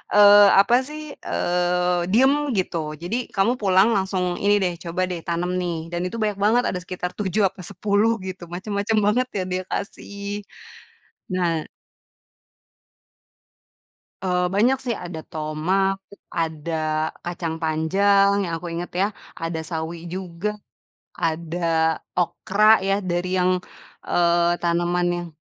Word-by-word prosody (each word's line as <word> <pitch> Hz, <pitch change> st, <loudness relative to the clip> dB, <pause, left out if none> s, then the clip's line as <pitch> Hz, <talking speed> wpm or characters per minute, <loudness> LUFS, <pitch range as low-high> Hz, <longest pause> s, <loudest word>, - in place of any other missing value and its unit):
eee, 205 Hz, 0 st, +9 dB
apa 200 Hz, +5 st, +5 dB
sih, 305 Hz, +1 st, -7 dB
eee, 180 Hz, 0 st, 0 dB
diem 265 Hz, +6 st, +5 dB, 0.2 s
gitu 160 Hz, -4 st, -2 dB
jadi 180 Hz, +8 st, -2 dB, 0.2 s
kamu 195 Hz, +5 st, +3 dB
pulang 190 Hz, +1 st, +5 dB
langsung 190 Hz, -1 st, 0 dB, 0.2 s
ini 205 Hz, +1 st, +5 dB
deh 180 Hz, -1 st, 0 dB
coba 170 Hz, +2 st, -2 dB
deh 175 Hz, -, -3 dB
tanam 170 Hz, +1 st, -1 dB
nih 175 Hz, -1 st, -2 dB, 0.2 s
dan 175 Hz, 0 st, -2 dB
itu 185 Hz, -, -7 dB
banyak 210 Hz, -2 st, 0 dB
banget 240 Hz, +3 st, +4 dB
ada 180 Hz, -, -2 dB
sekitar 180 Hz, -1 st, -4 dB
7 205 Hz, +1 st, 0 dB
apa 190 Hz, 0 st, -13 dB
10 205 Hz, +4 st, +2 dB
gitu 185 Hz, -1 st, -6 dB
macem-macem 200 Hz, +3 st, -1 dB
banget 250 Hz, +5 st, +2 dB
ya 185 Hz, -, 0 dB
dia 185 Hz, -, 0 dB
kasih. 200 Hz, 0 st, -5 dB, 0.9 s
Nah 170 Hz, -4 st, 0 dB, 2.6 s
eee, 180 Hz, -1 st, +1 dB
banyak 250 Hz, +6 st, +4 dB
sih 235 Hz, -, 0 dB
ada 170 Hz, -2 st, -6 dB
tomat, 160 Hz, +6 st, 0 dB, 0.4 s
ada 165 Hz, -1 st, -3 dB, 0.5 s
kacang 170 Hz, -2 st, -3 dB
panjang 200 Hz, +5 st, +3 dB
yang 165 Hz, -, -4 dB
aku 175 Hz, +1 st, -6 dB
inget 170 Hz, +1 st, -5 dB
ya, 200 Hz, -, +3 dB, 0.4 s
ada 165 Hz, 0 st, -2 dB
sawi 165 Hz, 0 st, -5 dB
juga, 185 Hz, +3 st, -4 dB, 0.6 s
ada 165 Hz, 0 st, 0 dB, 0.2 s
okra 200 Hz, +4 st, +1 dB, 0.2 s
ya 195 Hz, -, +2 dB
dari 180 Hz, 0 st, -2 dB
yang, 185 Hz, 0 st, +3 dB, 0.5 s
eee, 170 Hz, 0 st, +3 dB
tanaman 175 Hz, +1 st, +1 dB
yang 175 Hz, 0 st, -5 dB
180 Hz, 130 wpm, -23 LUFS, 170-200 Hz, 2.6 s, eee